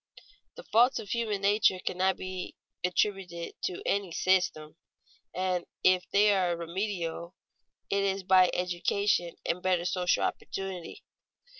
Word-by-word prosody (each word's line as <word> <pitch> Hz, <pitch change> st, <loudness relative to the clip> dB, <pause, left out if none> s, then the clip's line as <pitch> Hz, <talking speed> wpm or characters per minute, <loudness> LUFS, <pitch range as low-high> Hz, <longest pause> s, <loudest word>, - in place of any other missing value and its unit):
The -, -, -10 dB
faults 245 Hz, +4 st, +4 dB
of 205 Hz, -, -7 dB
human 215 Hz, -2 st, -1 dB
nature 200 Hz, -1 st, +3 dB
cannot 185 Hz, +1 st, 0 dB
be 185 Hz, -1 st, -6 dB, 0.3 s
attributed 180 Hz, -2 st, -1 dB
to 180 Hz, -, -4 dB
any 200 Hz, -3 st, 0 dB
"system"; 165 Hz, -4 st, +1 dB, 0.6 s
and 185 Hz, -1 st, -1 dB, 0.2 s
if 185 Hz, -1 st, +3 dB
they 205 Hz, +1 st, +4 dB
are 180 Hz, -3 st, +1 dB
remediable, 170 Hz, -1 st, -4 dB, 0.6 s
it 200 Hz, 0 st, +2 dB
is 195 Hz, 0 st, -1 dB
by 185 Hz, -1 st, +5 dB
education 180 Hz, 0 st, 0 dB
and 180 Hz, -, -1 dB
better 180 Hz, -2 st, +1 dB
social 180 Hz, 0 st, +1 dB
opportunity. 190 Hz, -3 st, -5 dB
185 Hz, 125 wpm, -29 LUFS, 175-200 Hz, 0.6 s, by